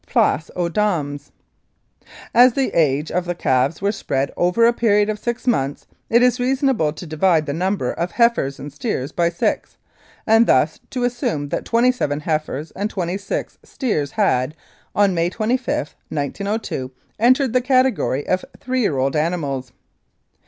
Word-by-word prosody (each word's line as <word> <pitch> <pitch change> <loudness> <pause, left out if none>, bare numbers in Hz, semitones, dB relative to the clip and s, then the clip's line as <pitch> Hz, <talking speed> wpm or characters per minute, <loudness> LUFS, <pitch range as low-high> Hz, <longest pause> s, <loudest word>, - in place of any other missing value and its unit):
Place 160 - +1
aux 175 -1 0
dames! 155 -7 -1 1.0
"As 245 0 +7
the 270 +1 0
ages 150 -2 +1
of 180 0 -1
the 175 0 -3
calves 135 +2 0
were 200 - +2
spread 140 -9 -2
over 180 +7 +3
a 235 - +4
period 210 -3 +2
of 210 - -6
six 240 +2 -3
months, 140 - 0 0.2
it 235 +2 +4
is 250 0 +3
reasonable 255 - +1
to 165 - -9
divide 160 0 +2
the 140 - -3
number 185 +5 -1
of 170 +1 -2
heifers 235 - +2
and 145 0 -8
steers 145 - -3
by 170 -1 +1
six, 170 - -2 0.5
and 225 +1 +5
thus 150 +5 +3
to 250 -1 -3
assume 240 - -1
that - - -3
twenty 240 +2 +3
seven 150 - -2
heifers 155 -1 -2
and 205 +2 -3
twenty 180 -1 -3
six 195 - -4
steers 155 - -2
had, 130 +4 +1 0.4
on 200 -2 +3
May 170 0 +1
25, 225 - -2
1902, 155 - -3 0.3
entered 255 +2 +3
the 255 - +3
category 255 - +1
of 185 - 0 0.2
three 255 0 -1
year 155 - +1
old 135 +2 0
animals. 150 -6 -1
180 Hz, 160 wpm, -20 LUFS, 150-235 Hz, 1.0 s, As